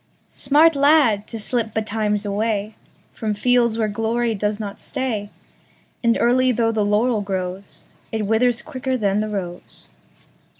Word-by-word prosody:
Smart 305 +3 +3
lad, 280 -8 +3
to 230 - -6
slip 225 0 -2
betimes 215 -1 -1
awayFrom 210 0 -4
fields 240 -1 +2
where 220 -1 +1
glory 225 +2 -1
does 210 0 -2
not 205 -2 -6
stay, 240 -7 -3 0.7
And 235 0 +3
early 255 +2 +3
though 230 -1 +1
the 215 -2 0
laurel 210 +2 +1
growsIt 195 +3 -6
withers 230 +3 +2
quicker 260 0 -3
than 200 -3 +1
the 215 0 -2
rose. 180 -4 -7
220 Hz, 130 wpm, -21 LUFS, 205-245 Hz, 0.7 s, Smart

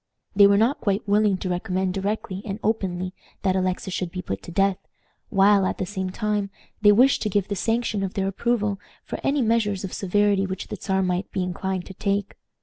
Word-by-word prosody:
They 200 0 +8
were 200 0 +4
not 230 +7 +2
quite 200 0 0
willing 205 -1 +3
to 185 - -4
recommend 185 0 -1
directly 195 -1 -3
and 200 -2 -4
openly 185 -4 -1 0.3
that 190 -2 +2
Alexis 185 0 -1
should 180 -2 -2
be 180 0 -5
put 95 0 -4
to - - -9
death, 195 +1 +2 0.5
while, 200 0 +5
at 185 - -1
the 190 - -2
same 190 -1 -3
time, 210 0 -1 0.3
they 205 -1 +7
wished 255 +6 +5
to 215 - 0
give 200 -1 0
the 200 - -1
sanction 225 0 0
of 195 -1 -3
their 195 -1 0
approval 210 0 0 0.2
for - - -6
any 275 -1 +2
measures 220 -4 +1
of 190 - -5
severity 200 0 +2
which 190 -1 -5
the - - -4
Czar 190 -1 0
might 180 +1 -1
be 190 - -1
inclined 185 0 -3
to 190 - -9
take. 200 +1 -2
195 Hz, 210 wpm, -24 LUFS, 185-210 Hz, 0.5 s, They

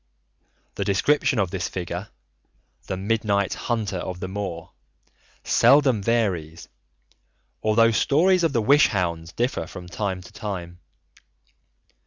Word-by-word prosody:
The 100 - -3
description 125 +8 +2
of 95 -5 0
this 95 -3 -3
figure, 90 +2 -5 0.8
"The 95 - -3
Midnight 100 -1 0
Hunter 110 -5 -2
of 90 0 -5
the 95 - -4
Moor," 95 -4 -5 0.7
seldom 135 -6 +4
varies, 95 -8 -1 0.9
although 115 +1 +4
stories 175 - +3
of 165 - +2
the 115 -4 0
Wish 145 +6 +5
Hounds 85 -4 -2
differ 120 -6 -2
from 90 -1 -9
time 95 +1 -3
to - - -15
time. 90 -5 -6
100 Hz, 120 wpm, -24 LUFS, 90-115 Hz, 0.9 s, Wish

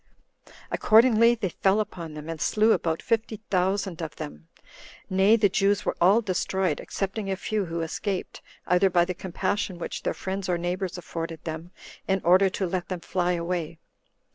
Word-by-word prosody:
Accordingly, 230 +1 +5
they 210 -5 -2
fell 190 +4 +2
upon 170 -7 -5
them, 150 0 -8
and 165 -2 -5
slew 215 +1 +3
about 165 -6 0
fifty 225 -2 -1
thousand 190 -1 0
of 160 -2 -5
them; 75 +2 -8 0.6
nay, 190 +4 +5
the 215 -2 +4
Jews 200 +1 +1
were - - 0
all 195 +6 +6
destroyed, 185 -3 -1
excepting 195 +1 -3
a 190 - 0
few 210 +1 -2
who 165 0 -3
escaped, 185 +4 -4 0.2
either 180 +2 +3
by 175 -1 +3
the 180 - -3
compassion 190 +1 -2
which 170 - -5
their - - -2
friends 190 0 -4
or 175 - +2
neighbors 180 +2 -3
afforded 165 -2 -6
them, 160 +1 -6 0.4
in 190 0 +2
order 185 +3 +5
to 190 - -2
let 180 0 -2
them 180 -2 -4
fly 180 0 0
away. 170 -1 -3
185 Hz, 170 wpm, -26 LUFS, 170-200 Hz, 0.6 s, all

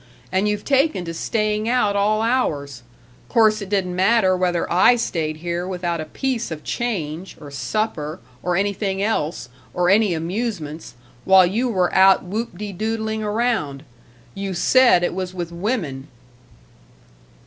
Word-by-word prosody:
And 190 +3 +1
you've 210 0 -3
taken 275 - +2
to 165 - -5
staying 215 +4 -1
out 210 -5 +2
all 215 +2 +2
hours 145 - -1 0.5
course 215 -2 +3
it 200 - -6
didn't 190 -3 -1
matter 190 0 +3
whether 180 -2 0
I 185 +7 +6
stayed 160 -9 -2
here 175 +2 -3
without 175 -3 -2
a - - -5
piece 250 - -2
of 155 -2 -7
change, 185 -7 -4
or 145 -1 -10
supper, 155 0 -3 0.2
or 180 -1 -1
anything 200 -1 -1
else, 160 - -2 0.3
or 180 0 +3
any 205 -3 +3
amusements, 165 -3 -4 0.3
while 190 -1 +6
you 225 +8 0
were 185 -5 +1
out 190 0 +5
whoop 200 +1 -4
de 205 +1 -5
doodling 220 +2 -2
around 210 - -1 0.5
You 195 -1 -4
said 240 -1 +5
it - - 0
was 185 0 -4
with 175 -2 -4
women!" 170 - -3
190 Hz, 150 wpm, -21 LUFS, 170-220 Hz, 0.5 s, I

